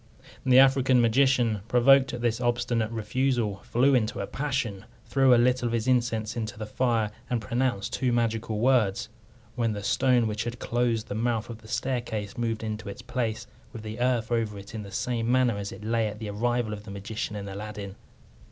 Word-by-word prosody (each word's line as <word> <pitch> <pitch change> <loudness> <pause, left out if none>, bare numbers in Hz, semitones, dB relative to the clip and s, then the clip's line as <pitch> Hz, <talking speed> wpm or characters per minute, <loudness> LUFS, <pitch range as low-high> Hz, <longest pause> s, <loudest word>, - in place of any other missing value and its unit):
The 130 -1 +5
African 135 -1 +5
magician, 120 -2 +3
provoked 130 +2 +5
at 120 - -5
this 120 0 0
obstinate 120 -2 0
refusal, 115 -1 -1
flew 125 +7 +2
into 115 -4 +1
a - - -2
passion, 130 -9 -3 0.2
threw 135 -1 +3
a 120 - +7
little 125 0 +2
of 115 - -2
his 115 +1 -1
incense 120 -3 +1
into 110 -3 -4
the 110 - -5
fire, 115 -1 0 0.2
and 120 - 0
pronounced 120 -1 -1
two 130 -2 0
magical 115 -2 0
words, 110 -4 +2 0.4
when 115 -2 0
the 100 -1 -5
stone 125 +1 +3
which 105 -1 -2
had 120 0 -4
closed 120 -2 0
the - - -4
mouth 115 +1 -1
of 115 - -9
the 110 - -14
staircase 120 -4 -3
moved 115 -2 -2
into 110 -1 -4
its 100 - -8
place, 115 -4 -2 0.3
with 110 - -9
the 110 +2 -6
earth 120 -2 +1
over 110 -3 0
it 100 +2 -10
in 110 - -4
the 100 - -9
same 115 +2 -1
manner 125 -3 +3
as 100 0 -5
it - - -10
lay 115 0 +1
at 105 0 -6
the 105 -1 -5
arrival 120 +1 0
of 105 0 -7
the 105 - -11
magician 105 +2 -5
and 100 -1 -5
Aladdin. 100 0 -7
115 Hz, 200 wpm, -27 LUFS, 110-125 Hz, 0.4 s, a